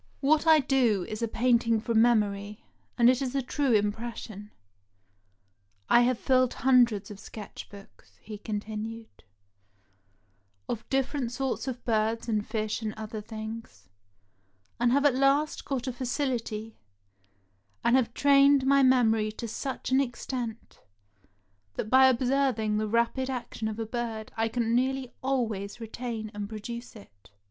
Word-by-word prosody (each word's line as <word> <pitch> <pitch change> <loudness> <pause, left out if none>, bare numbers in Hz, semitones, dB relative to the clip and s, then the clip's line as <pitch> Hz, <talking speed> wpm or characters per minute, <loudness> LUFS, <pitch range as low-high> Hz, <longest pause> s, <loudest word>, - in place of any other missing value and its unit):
What 305 +3 +2
I 320 -1 +8
do 245 -8 +2
is 215 +1 -6
a 230 - +1
painting 230 -1 +2
from 225 0 +2
memory, 210 -3 +1 0.3
and 235 - +5
it 255 +1 +4
is 265 0 -3
a 275 - +2
true 275 +1 0
impression. 210 -1 -2 1.4
I 240 - +7
have 245 0 +2
filled 255 0 +2
hundreds 240 -6 +3
of 200 - -10
sketch 210 -1 -9
books," 200 -1 -16
he 210 -1 -9
continued, 220 +2 -6 1.4
"of 225 -1 -5
different 270 -2 -1
sorts 265 +1 -3
of 255 -2 -5
birds 225 0 0
and 215 -2 0
fish 215 0 -3
and 215 -1 -4
other 220 0 -6
things, 220 - -8 0.9
and 240 0 +3
have 280 +3 +3
at 285 - +5
last 275 +3 +1
got 265 -3 -2
a 255 - -3
facility, 240 -4 -3 1.0
and 235 - +4
have 245 -3 +2
trained 280 -1 +5
my 275 +1 +5
memory 225 -5 +3
to 230 +2 -6
such 255 +3 -5
an 265 +1 +4
extent, 240 -2 -5 1.0
that 215 - -4
by 260 0 +7
observing 250 -4 +1
the 215 - -1
rapid 235 +4 +1
action 240 -3 -4
of 215 -1 -4
a 225 - -3
bird 225 -1 -4
I 225 0 +1
can 230 0 -1
nearly 260 +1 0
always 225 -6 -2
retain 225 -1 -5
and 205 -1 -5
produce 235 +3 -7
it. 100 - -16
235 Hz, 145 wpm, -28 LUFS, 215-260 Hz, 1.4 s, I